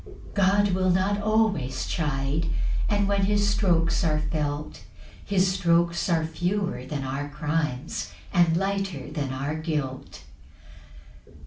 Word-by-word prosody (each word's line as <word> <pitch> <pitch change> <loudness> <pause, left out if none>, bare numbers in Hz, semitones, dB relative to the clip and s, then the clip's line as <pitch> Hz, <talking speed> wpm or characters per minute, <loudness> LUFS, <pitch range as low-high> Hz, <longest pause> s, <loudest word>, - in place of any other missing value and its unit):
2 - - -14 0.2
God 200 +1 +3
will 185 0 +1
not 190 +3 +2
always 215 - +1
chide; 150 0 -1 0.4
And 205 -1 +2
when 200 -1 +2
his 205 0 +2
strokes 170 -5 +2
are 155 -2 +2
felt, 150 -1 -3 0.4
His 190 -2 +2
strokes 170 -1 +2
are 165 -2 +2
fewer 180 -1 -2
than 140 0 -3
our 135 +2 -3
crimes, 150 -1 -2 0.2
And 170 -3 +4
lighter 195 -7 -2
than 145 -4 -2
our 135 +3 -2
guilt. 150 -5 -4
170 Hz, 125 wpm, -26 LUFS, 150-195 Hz, 0.4 s, And